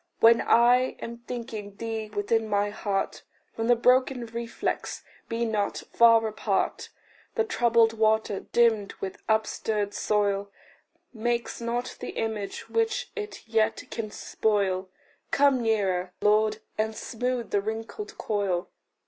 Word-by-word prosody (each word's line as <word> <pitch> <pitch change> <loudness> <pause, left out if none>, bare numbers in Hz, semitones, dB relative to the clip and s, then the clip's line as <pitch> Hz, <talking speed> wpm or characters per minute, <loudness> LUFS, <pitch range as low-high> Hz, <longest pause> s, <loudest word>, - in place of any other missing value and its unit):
When 230 +1 +7
I 245 +2 +4
am 235 0 -7
thinking 220 -4 -6
thee 225 -1 -4
within 215 +2 0
my 205 0 +1
heart, 200 -2 -2 0.3
From 225 0 -2
the 245 - +6
broken 250 +1 +3
reflex 235 +1 -4 0.3
be 230 +1 0
not 210 -3 -1
far 230 -1 +6
apart. 215 -1 -1 0.5
The 450 - +3
troubled 235 - +3
water, 220 -2 +2
dim 225 -4 +2
with 190 -1 -6
upstirred 215 -1 0
soil, 200 -1 0 0.6
Makes 235 +1 -2
not 240 +2 -3
the - - -6
image 220 -3 -3
which 455 0 0
it 420 - -6
yet 225 -1 +1
can 220 -2 -3
spoil: 195 -3 0 0.4
Come 275 -3 +4
nearer, 190 -5 0
Lord, 215 +1 +3 0.2
and 220 0 0
smooth 245 +1 -3
the 200 - +2
wrinkled 225 - -5
coil. 195 -4 -1
225 Hz, 125 wpm, -27 LUFS, 210-235 Hz, 0.6 s, When